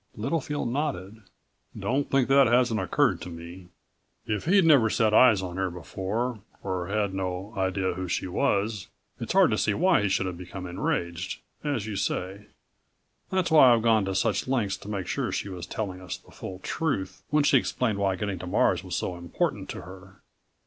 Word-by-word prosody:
Littlefield 140 +2 -2
nodded. 115 -7 -3 0.6
"Don't 140 +3 -1
think 135 -2 +2
that 135 -1 +6
hasn't 120 -2 +3
occurred 95 - +1
to 90 - -6
me. 85 +2 -10 0.6
If 105 -2 -2
he'd 190 +1 +4
never 140 -9 +6
set 110 0 +2
eyes 110 -5 +6
on 90 -1 -5
her 95 -1 0
before, 100 +7 -3 0.2
or 95 -2 -3
had 100 -1 -1
no 95 +2 -4
idea 95 -1 0
who 95 +1 -4
she 90 - -1
was... 100 +2 0 0.3
it's - - -3
hard - - +5
to - - +1
see 105 - +1
why 180 - +3
he 100 - +1
should 95 - +1
have 90 -2 -5
become 90 +1 -7
enraged, 90 0 -3 0.2
as 140 -8 -1
you 110 -2 -4
say. 95 +2 -3 0.8
That's 185 -3 0
why 140 -5 +8
I've 115 - -1
gone 110 -3 +3
to 95 0 -2
such 105 +2 0
lengths 115 -7 0
to - - -13
make 100 -3 -3
sure - - -2
she - - -3
was 90 -2 -7
telling 95 -4 -4
us 90 -2 -5
the - - -21
full 95 - -8
truth 95 - -2
when 150 0 +3
she 140 -2 +5
explained 115 -4 -1
why 95 -1 +1
getting 95 -1 -3
to 90 - -7
Mars 90 -1 +2
was 90 -2 -4
so 90 - -2
important 85 0 -2
to - - -6
her." 95 +1 -13
100 Hz, 190 wpm, -27 LUFS, 95-120 Hz, 0.8 s, why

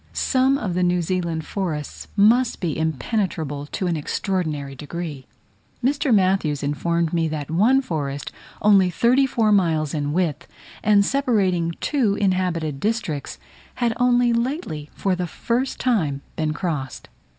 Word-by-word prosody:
Some 265 +1 +2
of 205 -9 -3
the 180 - 0
New 180 -1 +2
Zealand 170 -3 -2
forest 160 -7 -4
must 230 +4 +4
be 165 -5 -2
impenetrable 160 - -2
to 185 - -3
an 175 -2 0
extraordinary 155 -3 -2
degree. 150 -1 -6 0.6
Mr. 280 +1 +1
Matthews 185 -8 +2
informed 165 +3 0
me 165 -1 +1
that 155 -1 -4
one 240 +11 +4
forest 145 - -3 0.3
only 200 -3 +5
thirty 250 +9 +3
four 225 -4 +1
miles 160 -7 +2
in 145 -2 -1
width, 170 -1 -1 0.4
and 205 -1 +4
separating 195 -11 +1
two 245 -9 +1
inhabited 180 -7 0
districts, 205 -9 -2 0.4
had 240 -2 0
only 245 -1 +3
lately, 235 - -2
for 195 -2 0
the 180 -1 -3
first 240 +10 -2
time, 160 - 0
been 155 -1 -1
crossed. 150 -4 -4
180 Hz, 140 wpm, -22 LUFS, 155-220 Hz, 0.6 s, only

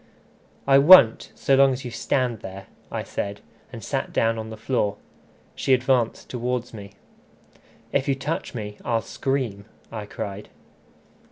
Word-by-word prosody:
"I 135 0 +6
won't, 140 -7 +7
so 135 - +1
long 135 0 +5
as 130 +1 -6
you 120 - -5
stand 120 0 -1
there," 95 0 -9 0.3
I - - -3
said, 100 +1 -4 0.3
and - - -9
sat - - -3
down 115 0 +1
on 110 0 -6
the 110 - -8
floor. 105 -3 -1 0.6
She 135 - +2
advanced 125 -2 0
towards 125 0 -3
me. 100 -2 -10 1.0
"If 135 - 0
you 135 - +2
touch 140 +1 -4
me, 105 -2 -6
I'll 115 -2 0
scream," 125 -7 -3 0.3
I 105 -2 -6
cried. 100 0 -6
120 Hz, 150 wpm, -24 LUFS, 105-135 Hz, 1.0 s, won't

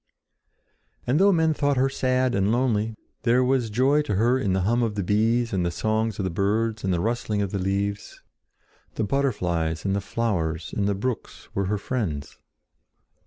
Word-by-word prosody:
And 135 +6 +2
though 200 +1 +6
men 160 -3 +3
thought 145 -2 +1
her 130 +1 +3
sad 130 -1 +1
and 100 -1 +2
lonely, 115 -3 +1 0.3
there 125 +1 +3
was 125 -3 +1
joy 130 +7 +3
to 140 -9 -2
her 120 +6 +3
in 100 -7 0
the 95 - +1
hum 115 +6 +1
of 110 -3 -1
the 100 - -1
bees 115 +4 +1
and 95 -2 +1
the 85 - +1
song 110 +5 0
of 105 -2 -4
the 95 - -1
birds 110 +4 0
and 95 - 0
the 90 - +1
rustling 110 0 -1
of 95 - -3
the 100 - -2
leaves. 100 +2 -2 0.8
The - - -1
butterflies 90 - -1
and 100 0 +1
the 100 - -1
flowers 90 -7 -2
and 100 -1 0
the 100 - +1
brooks 115 +3 -5
were 100 - 0
her 105 +2 0
friends. 100 - -4
110 Hz, 190 wpm, -25 LUFS, 100-125 Hz, 0.8 s, though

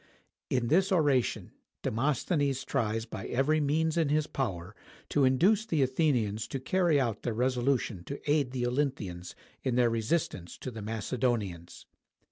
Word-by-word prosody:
In 120 -2 0
this 190 +4 +3
oration, 145 -9 +1 0.3
Demosthenes 140 - 0
tries 115 -4 -1
by 115 - -6
every 140 +5 +2
means 155 +3 +1
in 160 -4 +2
his 150 +1 +2
power 100 - -4 0.3
to 140 -2 +3
induce 185 +12 +4
the 160 -10 +1
Athenians 125 -7 +1
to 135 - -4
carry 170 +2 +2
out 115 -6 -1
their 115 - -2
resolution 125 -5 0
to 140 - -5
aid 145 -3 +2
the 125 -1 -2
Olynthians 120 -10 -2 0.3
in 130 -2 -1
their 120 -2 +3
resistance 115 - -2
to 130 - -6
the 110 -2 -7
Macedonians. 110 -5 -2
130 Hz, 145 wpm, -30 LUFS, 115-145 Hz, 0.3 s, induce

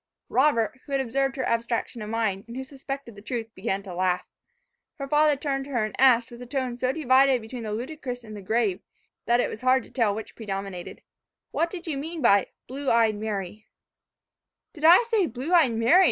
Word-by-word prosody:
Robert, 260 -3 +2
who 280 - -8
had 275 - +2
observed 270 +2 0
her 265 - -2
abstraction 230 0 -1
of 210 - -6
mind, 215 -4 -1
and 235 +2 -8
who 265 - -3
suspected 275 -2 -7
the 205 - -12
truth, 225 0 -5
began 190 +1 -2
to 190 -3 -8
laugh. 180 0 0 0.7
Her 275 - -6
father 300 +1 +4
turned 270 -1 -2
to - - -11
her 230 -3 +1
and 215 - -6
asked, 245 -3 +5
with 240 +1 -10
a 245 - -8
tone 255 -2 -2
so 255 +1 +1
divided 265 -2 +4
between 235 +2 -8
the 215 -2 -4
ludicrous 250 +1 -5
and 215 -1 -9
the 205 - -8
grave, 210 -1 0 0.5
that 240 +1 +4
it - - +2
was - - -7
hard 255 0 +3
to - - -17
tell 225 -6 +1
which 220 - -7
predominated, 195 -4 -6 0.5
"What 335 - 0
do 370 - -6
you 300 -5 -3
mean 325 +3 -5
by 200 -4 +5 0.2
'blue 275 +2 -3
eyed 230 -2 +4
Mary'?" 210 -1 -5 1.1
"Did 310 -2 -4
I 345 +8 +8
say 450 -6 +1
blue 260 +8 -4
eyed 310 -9 +5
Mary?" 230 +10 +5
245 Hz, 210 wpm, -26 LUFS, 220-275 Hz, 1.1 s, I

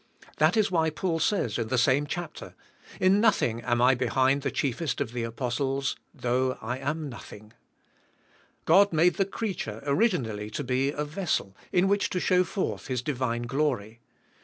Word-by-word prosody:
That - - +3
is 210 -3 +2
why 160 -3 +2
Paul 165 +2 -2
says, 155 - 0
in 115 - -1
the 130 +2 0
same 135 +4 +3
chapter, 175 +1 -6 0.4
"In 190 +2 +4
nothing 120 - +2
am 120 0 +1
I 130 +1 +6
behind 130 +2 +2
the - - -1
chief 140 0 -2
est 150 -8 -1
of 115 - -2
the 120 - -2
Apostles, 130 +3 -2 0.2
though 130 +1 -1
I 125 +4 -4
am 150 +3 -3
nothing, 110 -4 -11 1.1
God 200 +1 +5
made 170 +2 +3
the 195 - +2
creature 190 - -4
originally 140 - 0
to 125 +7 -4
be 130 +2 0
a 145 +1 -2
vessel, 150 - -2 0.2
in 180 +1 +3
which 200 +1 +1
to - - -3
shov7 180 0 +3
forth 195 - -3
His 125 -3 -2
divine 125 -4 -2
glory. 120 -4 -1
135 Hz, 170 wpm, -27 LUFS, 120-175 Hz, 1.1 s, I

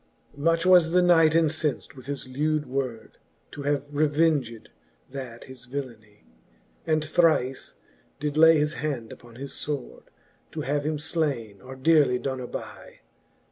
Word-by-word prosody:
Much 165 +4 +1
was 175 -3 +5
the 180 - +5
knight 165 -3 +5
incenft 160 -3 0
with 130 -1 -12
his 140 -2 -5
lewd 150 +3 -1
word, 130 -3 -5 0.3
To 145 - -8
have 145 -1 0
revenged 145 -6 +1 0.4
that 130 -4 -7
his 125 -2 -12
villeny; 115 -6 -8 0.6
j^d 155 -1 +2
thrife 155 -5 +1 0.5
did 150 0 -2
lay 160 +1 +7
his 150 +1 0
hand 135 -9 -4
upon 120 -1 -15
his 135 +2 -6
fword. 145 -4 -5 0.5
To - - -4
have 145 +2 -1
him 155 -1 -1 0.2
(laine, 115 -11 -2
or 130 +4 -10
dearely 140 -2 +3
doen 130 0 -3
aby. 125 - -9
145 Hz, 140 wpm, -26 LUFS, 130-155 Hz, 0.6 s, lay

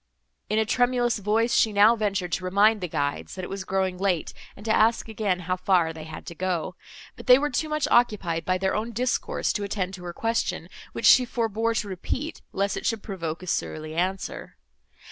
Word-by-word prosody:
In 215 - +1
a 220 - +3
tremulous 245 0 +1
voice, 220 +4 +1
she 220 - +4
now 210 +3 +6
ventured 200 -5 -1
to 185 - -1
remind 205 +3 +3
the 180 - -2
guides, 145 -3 -3
that 185 - -6
it 180 - -6
was 195 -1 -4
growing 185 -1 -1
late, 185 -4 0 0.2
and 205 - -13
to 220 - +2
ask 225 +1 +3
again 205 -5 -1
how 180 +1 -1
far 180 -3 +2
they 160 -1 -9
had 160 -1 -9
to - - -7
go: 180 0 -2 0.4
but - - -12
they 250 0 +9
were 295 +2 -1
too 310 +5 -1
much 305 -1 0
occupied 195 -9 +2
by 185 +2 +1
their 190 +1 0
own 225 +2 -3
discourse 250 +3 -1
to 210 - -2
attend 195 -2 -2
to 180 -2 -9
her 175 - -5
question, 225 +5 -2 0.2
which - - -3
she 255 - +8
forbore 230 -1 -1
to 210 - -1
repeat, 255 - -4
lest 200 0 -1
it - - -6
should 225 -2 -1
provoke 170 -4 -5
a - - -7
surly 155 -2 -3
answer. 185 +3 -3
200 Hz, 210 wpm, -25 LUFS, 180-225 Hz, 0.4 s, they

